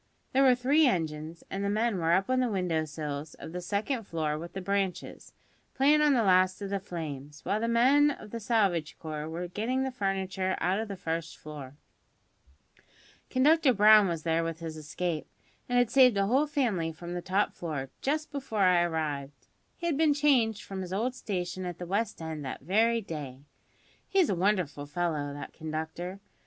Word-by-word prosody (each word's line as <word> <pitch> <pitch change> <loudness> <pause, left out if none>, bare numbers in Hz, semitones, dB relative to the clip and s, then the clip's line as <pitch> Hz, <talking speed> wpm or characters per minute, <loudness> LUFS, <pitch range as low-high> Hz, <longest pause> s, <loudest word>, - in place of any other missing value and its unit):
There 265 - +4
were 260 -2 +6
three 280 +5 +4
engines, 160 -4 -2
and 195 +1 -2
the 200 - 0
men 215 -1 +1
were 165 0 +2
up 190 +2 +2
on 255 0 +2
the 250 -1 +1
window 180 -6 0
sills 150 -1 -5
of - - -9
the 180 +1 -5
second 215 +6 -2
floor 155 -2 -1
with 170 +3 -7
the 195 - -4
branches, 190 -1 -2 0.4
playin' 290 +3 +4
on 295 -2 +4
the 235 - +3
last 185 -1 +4
of 200 -1 -5
the 200 - 0
flames, 150 -6 -7
while 205 - 0
the 230 - -1
men 260 +6 +5
of 215 -7 -7
the 230 - -4
salvage 200 -8 +1
corps 155 -1 -5
were 175 +2 -4
getting 230 +8 -1
the 265 - -2
furniture 190 -4 -1
out 185 +3 +1
of 220 - -3
the 200 - -5
first 165 -1 -4
floor. 145 -3 -9 1.5
Conductor 285 0 +4
Brown 210 0 +7
was 165 -3 -3
there 165 0 +1
with 165 0 -4
his 165 -1 -6
escape, 155 +1 -3 0.4
and 245 - +2
had 245 -2 +3
saved 255 -5 +6
a 195 - +3
whole 265 +8 +2
family 230 - 0
from 170 +2 -8
the 175 - -3
top 190 +3 0
floor, 145 -6 -5
just 305 +3 -1
before 270 -7 -3
I 180 -2 +5
arrived. 150 -4 -3 0.3
He 340 - -6
had 330 -5 +1
been 310 -2 +4
changed 255 -8 +2
from 195 -1 -6
his 185 -1 -6
old 230 +7 0
station 185 -6 -4
at 175 -2 -5
the 175 - -6
West 205 +5 -1
End 160 -2 -5
that 130 - -5
very 225 +5 +2
day. 145 -8 -7 0.7
He's 375 - +3
a - - +2
wonderful 175 -6 0
fellow, 150 -2 -2
that 145 - -8
conductor! 160 +4 -5
185 Hz, 195 wpm, -29 LUFS, 160-230 Hz, 1.5 s, Brown